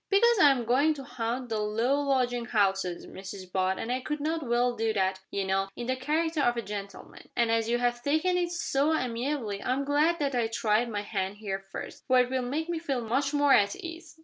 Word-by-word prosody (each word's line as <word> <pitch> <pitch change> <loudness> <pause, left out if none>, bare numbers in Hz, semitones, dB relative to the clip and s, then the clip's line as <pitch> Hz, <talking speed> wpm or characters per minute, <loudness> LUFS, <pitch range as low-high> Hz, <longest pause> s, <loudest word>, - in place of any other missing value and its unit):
"Because 460 +3 +4
I 290 - +8
am 255 -4 +1
going 280 +7 +3
to 275 - -8
haunt 245 -1 -3
the 220 -1 -1
low 230 +7 +1
lodging 250 -4 0
houses, 195 -5 0
Mrs 190 -1 -9
Butt 190 0 +1
and 235 - -3
I 255 - 0
could 300 +3 -3
not 320 +2 -1
well 240 -2 +1
do 225 -1 0
that, 190 -2 0
you 200 - -2
know, 195 0 0
in 240 - -5
the 255 +1 0
character 310 +4 0
of 240 -3 +2
a 235 - -2
gentleman; 200 -1 -8
and 235 -2 +2
as 225 0 +1
you 240 - +2
have 240 0 0
taken 315 +7 +1
it 350 -1 0
so 315 -3 +1
amiably 240 -4 -2
I'm 265 +2 -1
glad 305 +4 +2
I 260 -6 0
tried 225 +1 +1
my 205 -2 -2
hand 195 -1 -3
here 200 -2 -3
first, - - -8
for 255 - +4
it 250 0 +2
will 260 -1 0
make 290 +7 -2
me 340 -1 -2
feel 275 -6 -2
much 270 +5 0
more 290 -2 +4
at 205 - +4
ease." 335 -3 -9
245 Hz, 225 wpm, -28 LUFS, 215-290 Hz, -, I